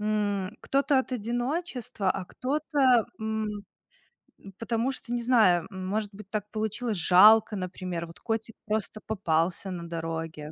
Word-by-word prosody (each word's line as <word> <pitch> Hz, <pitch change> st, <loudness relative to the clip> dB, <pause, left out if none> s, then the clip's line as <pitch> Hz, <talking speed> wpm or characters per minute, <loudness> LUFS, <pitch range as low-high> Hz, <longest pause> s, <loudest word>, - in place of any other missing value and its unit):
м 210 Hz, -1 st, -1 dB
кто-то 275 Hz, 0 st, +2 dB
от 260 Hz, -, -2 dB
одиночества, 245 Hz, -, -2 dB
а 195 Hz, -, -2 dB
кто-то, 265 Hz, -, +2 dB
м 220 Hz, 0 st, -2 dB, 0.9 s
м 195 Hz, -1 st, -12 dB
потому 230 Hz, +2 st, 0 dB
что, 255 Hz, -2 st, -6 dB
не 240 Hz, -, 0 dB
знаю, 210 Hz, -8 st, +4 dB
может 200 Hz, +3 st, -3 dB
быть, 195 Hz, 0 st, -12 dB
так 210 Hz, -1 st, -3 dB
получилось. 220 Hz, +1 st, -2 dB
Жалко, 210 Hz, +6 st, +6 dB
например, 185 Hz, -2 st, -4 dB
вот 165 Hz, -, -14 dB
котик 225 Hz, -1 st, -3 dB
просто 215 Hz, 0 st, -2 dB
попался 185 Hz, -2 st, 0 dB
на 170 Hz, -2 st, -6 dB
дороге. 165 Hz, -2 st, -5 dB
215 Hz, 135 wpm, -28 LUFS, 185-235 Hz, 0.9 s, Жалко